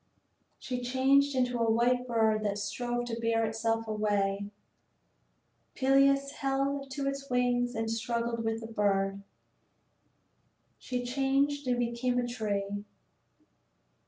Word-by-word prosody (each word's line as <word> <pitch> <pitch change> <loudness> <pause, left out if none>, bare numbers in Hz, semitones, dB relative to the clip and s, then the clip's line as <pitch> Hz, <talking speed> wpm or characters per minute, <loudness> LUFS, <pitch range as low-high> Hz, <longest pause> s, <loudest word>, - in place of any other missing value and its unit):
She 250 -1 -4
changed 270 +3 +3
into 250 -1 +1
a 230 -1 +2
white 245 +2 +2
bird 220 -2 +2
that 205 -1 -1
strove 240 +4 -2
to 230 -1 -4
bear 230 0 +1
itself 225 +1 -1
away. 205 -2 0 1.3
Peleus 275 +1 +3
held 275 0 -1
to 275 0 -3
its 275 0 -4
wings 245 -1 +1
and 225 0 -1
struggled 230 +1 -2
with 225 0 -1
the 225 - -6
bird. 195 -1 +1 1.6
She 250 -1 -3
changed 275 +2 +1
and 245 -1 +2
became 240 +1 0
a 245 - +1
tree. 205 -3 -2
240 Hz, 120 wpm, -30 LUFS, 225-265 Hz, 1.6 s, changed